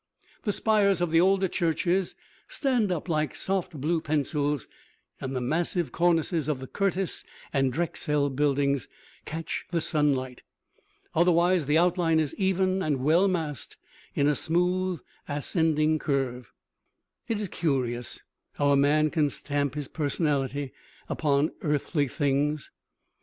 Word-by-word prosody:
The 210 - +2
spires 205 -2 +2
of 175 -2 0
the 165 +1 +5
older 190 +1 +3
churches 175 +2 0 0.3
stand 245 -8 0
up 175 0 -2
like 155 -3 0
soft 185 -5 -2
blue 160 +4 0
pencils, 145 -2 -1 0.5
and 135 0 -4
the 130 - -1
massive 165 +6 0
cornices 165 -2 +1
of 150 - 0
the 130 - -7
Curtis 195 +4 -1 0.3
and 135 -2 +2
Drexel 150 -2 0
buildings 140 -1 +1 0.4
catch 165 +1 -5
the 170 - 0
sunlight. 145 -6 0 0.7
Otherwise 175 -1 +3
the 150 +1 +3
outline 170 -2 +3
is 155 -3 -1
even 190 0 +1
and 145 -7 -1
well 165 +7 +4
massed 160 - -3 0.4
in 140 - +3
a 150 - +4
smooth 180 +3 0 0.3
ascending 155 +1 +1
curve. 130 -5 -2 0.8
It 225 -2 -1
is 205 -3 -3
curious 125 -8 -2 0.3
how 145 0 +1
a - - +5
man 150 +2 +3
can 155 -3 +2
stamp 145 -1 -2
his 145 -2 -4
personality 145 -3 -1 0.4
upon 145 0 +1
earthly 150 0 0
things. 145 +2 0
155 Hz, 130 wpm, -27 LUFS, 145-175 Hz, 0.8 s, the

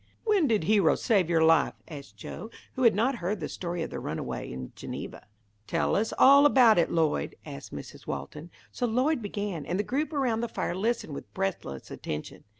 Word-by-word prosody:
"When 410 -8 +3
did 220 -7 +2
Hero 195 -2 +4
save 195 -8 +2
your 165 -2 +3
life?" 160 -1 +4
asked 140 -9 -10
Joe, 210 - -8 0.2
who 260 - -4
had 235 -5 +5
not 240 +5 +1
heard 195 +2 -2
the 150 - -3
story 175 -2 -4
of - - -6
the - - -4
runaway - - -4
in 65 0 -7
Geneva. - - -7 0.4
"Tell 165 -1 +1
us 220 +2 +1
all 280 +2 +8
about 240 -8 +6
it, 170 - +2
Lloyd," 160 - 0
asked 70 - -9
Mrs. - - -9
Walton. 150 - -6 0.2
So 245 - -1
Lloyd 255 +5 +1
began, 205 -6 -4
and 180 - -2
the 205 - 0
group 290 +7 -2
around 255 -7 0
the 235 - -1
fire - - -3
listened 205 -4 -1
with - - -8
breathless 190 - -4
attention. 75 - -6
200 Hz, 195 wpm, -28 LUFS, 160-240 Hz, 0.4 s, all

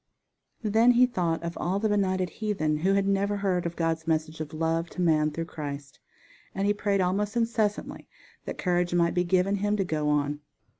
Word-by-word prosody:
Then 225 +3 +4
he 250 +1 +6
thought 175 -9 -1
of 170 +1 -4
all 185 +3 0
the 220 +2 +1
benighted 190 -3 0
heathen 170 -9 -1
who 190 +5 +2
had 200 0 +1
never 200 +1 +1
heard 185 -3 0
of 170 - -6
God's 165 -1 -1
message 155 0 -1
of 150 -1 -5
love 165 +1 -1
to 180 - -5
man 155 -2 +3
through 165 +2 -4
Christ, 145 -3 -7 0.6
and 195 - 0
he 205 - +3
prayed 200 -1 0
almost 200 +4 0
incessantly 225 -3 -1 0.4
that - - -5
courage 175 -1 0
might 170 -1 +2
be 180 - +2
given 185 +3 +2
him 205 +1 0
to 195 - +1
go 155 -4 -1
on. 145 0 0
180 Hz, 195 wpm, -27 LUFS, 160-200 Hz, 0.6 s, he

